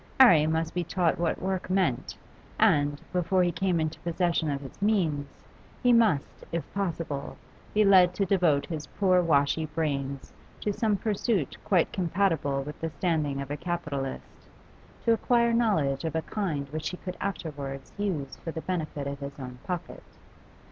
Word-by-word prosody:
'Arry 170 - +8
must 160 0 0
be 175 - 0
taught 170 0 0
what 170 -1 0
work 190 0 -2
meant, 185 -10 0 0.4
and, 145 0 +3
before 180 +1 +2
he 175 - +2
came 180 0 0
into 155 0 -2
possession 170 -2 0
of 140 -1 -2
his 135 +7 -11
means, 170 -9 +1 0.6
he 245 -1 +5
must, 215 -12 +2
if 170 -1 -1
possible, 165 -7 -3 0.4
be 215 0 +5
led 185 -3 +7
to 195 - +1
devote 175 -7 +3
his 155 -4 -5
poor 185 -3 +3
washy 155 -1 +2
brains 140 -3 -3 0.3
to 205 - -1
some 210 -1 +1
pursuit 205 - 0
quite 180 -5 +2
compatible 165 -6 +1
with 150 +1 -8
the 165 - -1
standing 150 -3 -1
of 140 0 -5
a 145 - -2
capitalist, 150 -7 -4 0.6
to 230 - +5
acquire 235 +1 +2
knowledge 165 - +2
of 160 -1 -3
a 160 - 0
kind 160 -10 -2
which 155 +2 -3
he 180 - -6
could 180 0 -6
afterwards 145 -8 -5
use 175 -10 -3
for - - -7
the 160 - -5
benefit 155 -6 -3
of 140 0 -4
his 140 0 -7
own 125 -2 -8
pocket. 180 -3 -4
165 Hz, 165 wpm, -28 LUFS, 145-190 Hz, 0.6 s, Arry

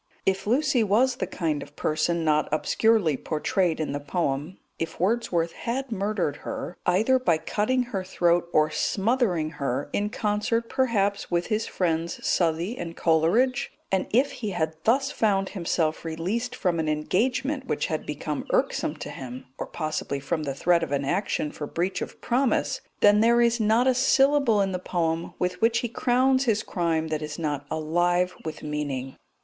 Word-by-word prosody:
If 195 +1 0
Lucy 260 0 +3
was 245 +5 +2
the 185 - -2
kind 160 -5 -2
of 145 - -11
person 160 +2 0
not 155 -1 +2
obscurely 195 +1 +2
portrayed 160 +3 0
in 155 - -2
the 145 - -2
poem; 145 +2 -2 0.2
if 165 - -4
Wordsworth 180 -4 +1
had 250 +5 -4
murdered 200 -7 -1
her, 180 - -6
either 220 +9 +3
by 175 -11 +2
cutting 215 +10 0
her 205 -6 -4
throat 175 -2 +1
or 155 -1 +3
smothering 195 - +1
her, 135 +1 -2
in 205 +1 0
concert, 215 +2 -1
perhaps, 205 -6 0
with 175 0 0
his 215 +1 0
friends 165 -2 -1
Southey 170 +5 +1
and 170 -1 -6
Coleridge; 180 +11 +2 0.2
and 190 -1 +1
if 260 +5 +3
he 215 - -4
had 160 -4 -1
thus 270 +5 +3
found 195 -6 +1
himself 165 -4 -1
released 190 +10 -3
from 180 -9 0
an 155 -1 0
engagement 255 - 0
which - - -1
had 155 -3 -2
become 150 0 -4
irksome - - 0
to - - -7
him, 130 -1 -8
or - - -3
possibly 155 -3 -3
from 155 +4 -2
the 140 -3 -3
threat 170 +4 +3
of 165 - -3
an 140 -1 0
action 175 -2 -1
for 150 - -6
breach 180 +5 -2
of - - -6
promise, 255 +2 +1 0.2
then 205 0 +6
there 235 +2 +4
is 235 0 +3
not 220 +3 +3
a 260 - +4
syllable 270 -3 +4
in 195 -1 0
the 180 - -2
poem 165 -2 -2
with 180 +3 -2
which 230 +1 +3
he 240 - -1
crowns 260 +3 +2
his 220 -3 +1
crime 165 -3 -1
that 155 -1 -2
is 150 0 -5
not 145 -3 -3
alive 175 +3 +1
with 160 -1 -6
meaning. 145 -3 -3
180 Hz, 175 wpm, -26 LUFS, 160-230 Hz, 0.2 s, then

